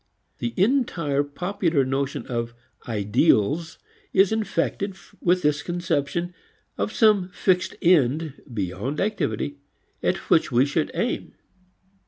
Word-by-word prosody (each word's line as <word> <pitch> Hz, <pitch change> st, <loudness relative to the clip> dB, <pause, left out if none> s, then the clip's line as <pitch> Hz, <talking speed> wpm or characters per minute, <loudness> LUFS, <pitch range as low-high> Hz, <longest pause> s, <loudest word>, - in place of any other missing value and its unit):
The 120 Hz, -1 st, -3 dB
entire 180 Hz, -, +2 dB
popular 170 Hz, -1 st, 0 dB
notion 135 Hz, +1 st, -2 dB
of 120 Hz, -1 st, -3 dB, 0.3 s
"ideals" 110 Hz, +8 st, +2 dB, 0.4 s
is 195 Hz, +1 st, +5 dB
infected 200 Hz, -2 st, -1 dB, 0.3 s
with 180 Hz, +1 st, +2 dB
this 150 Hz, 0 st, +2 dB
conception 175 Hz, 0 st, -2 dB, 0.4 s
of -, -, -2 dB
some 210 Hz, -6 st, +4 dB
fixed 180 Hz, 0 st, +1 dB
end 155 Hz, -3 st, +2 dB
beyond 100 Hz, +7 st, -3 dB
activity 165 Hz, -7 st, -1 dB, 0.4 s
at -, -, +1 dB
which -, -, +4 dB
we 125 Hz, +3 st, +4 dB
should 150 Hz, +2 st, 0 dB
aim. 240 Hz, -, -2 dB
160 Hz, 110 wpm, -24 LUFS, 135-185 Hz, 0.4 s, is